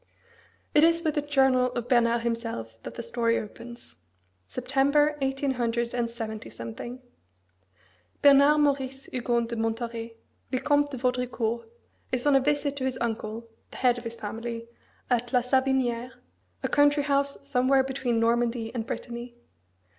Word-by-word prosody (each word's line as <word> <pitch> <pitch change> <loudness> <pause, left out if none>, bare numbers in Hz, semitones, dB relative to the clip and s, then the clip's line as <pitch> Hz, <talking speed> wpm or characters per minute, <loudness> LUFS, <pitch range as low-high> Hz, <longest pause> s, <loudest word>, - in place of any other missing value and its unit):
It 300 - +6
is 335 +1 +4
with 310 -2 +1
the 295 - 0
journal 265 -3 +3
of 240 0 -3
Bernard 235 -2 +3
himself 230 - -3
that - - -8
the 235 - -5
story 230 0 +1
opens, 235 +3 -9 0.5
September 280 +4 +2
187. 235 - -3 1.2
Bernard 285 +1 +7
Maurice 275 -2 0
Hugon 240 -1 +1
de 235 0 -5
Montauret, 230 0 -3 0.3
Vicomte 290 +3 +2
de 270 - -6
Vaudricourt, 250 - -1 0.4
is 255 0 0
on 290 -1 +5
a - - +7
visit 285 +1 0
to 265 - -3
his 260 -1 -1
uncle, 225 0 -3 0.2
the - - -11
head 245 -1 +3
of - - -12
his 230 -1 -5
family, 230 +2 -5 0.4
at 245 0 +1
La 250 - +5
Savinière, 255 -1 +1 0.5
a - - +1
country 290 0 +4
house 280 0 0
somewhere 265 0 +3
between 260 -3 -1
Normandy 230 0 +1
and 230 -2 -3
Brittany. 240 0 -6
245 Hz, 135 wpm, -27 LUFS, 235-270 Hz, 1.2 s, Bernard